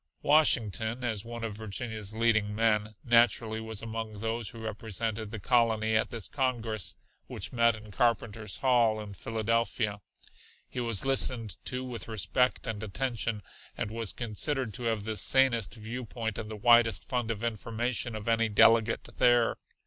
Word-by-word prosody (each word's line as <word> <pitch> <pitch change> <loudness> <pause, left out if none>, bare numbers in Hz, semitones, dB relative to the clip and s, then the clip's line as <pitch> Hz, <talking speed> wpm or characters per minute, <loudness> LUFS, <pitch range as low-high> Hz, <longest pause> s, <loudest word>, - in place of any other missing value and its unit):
Washington, 120 -5 +3
as 110 -4 -1
one 115 0 -7
of 110 -2 -3
Virginia's 110 0 -5
leading 110 -2 +1
men, 105 -1 +1
naturally 115 -2 +3
was 110 -1 -5
among 110 -2 -5
those 115 0 -1
who 115 - -10
represented 110 0 -3
the 110 0 -6
colony 110 0 +2
at 110 - +2
this 115 -4 -4
congress, 120 - -2 0.3
which - - -4
met 115 -2 +3
in 110 -1 -12
Carpenter's 110 -1 -1
Hall 120 -4 +3
in 105 -2 -7
Philadelphia. 110 0 -1 0.7
He - - -6
was 115 -1 0
listened 125 -6 +2
to 125 0 -2
with 120 -5 -6
respect 110 +4 0
and 110 -4 -4
attention, 115 0 -2 0.3
and 105 - -3
was 115 -2 -2
considered 120 +1 -1
to 125 +2 -4
have 110 -3 0
the 110 +1 -3
sanest 120 -1 +2
viewpoint 115 -1 -5
and 110 - -6
the 110 - -6
widest 115 -5 +4
fund 125 -3 -2
of 110 -1 -3
information 115 +1 -2
of 105 0 -7
any 115 -1 +2
delegate 115 +2 +4
there. 120 -1 +4
115 Hz, 155 wpm, -29 LUFS, 110-120 Hz, 0.7 s, widest